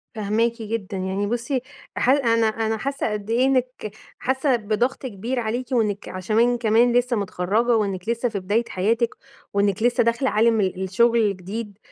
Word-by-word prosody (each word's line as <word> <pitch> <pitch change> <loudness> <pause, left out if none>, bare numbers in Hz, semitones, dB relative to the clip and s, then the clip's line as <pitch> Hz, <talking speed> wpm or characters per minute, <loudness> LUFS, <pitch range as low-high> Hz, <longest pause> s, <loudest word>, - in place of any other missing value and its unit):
فاهماكِ 225 +3 0
جدًا، 210 -3 -4
يعني 190 +2 -2
بُصّي 240 +3 -1 0.4
ح 250 - +1
أنا 230 -5 +3
أنا 220 0 -1
حاسة 275 -2 -2
قد 210 0 -5
إيه 245 +3 +3
إنِّك 255 -5 -1 0.3
حاسة 265 +1 +1
بضغط 235 +5 -1
كبير 240 +3 -3
عليكِ، 240 +3 -3
وإنِّك 210 -5 0
عشمان 225 +6 +1
كمان 235 +1 +3
لسه 245 0 +2
متخرجة، 205 +5 +1
وإنِّك 195 -1 -2
لسه 235 +1 0
في 205 -3 -3
بداية 205 +5 0
حياتِك، 230 +5 0 0.4
وإنِّك 200 +1 +1
لسه 245 -1 +3
داخلة 235 +3 +1
عالم 225 0 +3
ال 190 0 -1
الشغل 215 0 +2
جديد، 205 +2 -6
225 Hz, 160 wpm, -23 LUFS, 205-240 Hz, 0.4 s, أنا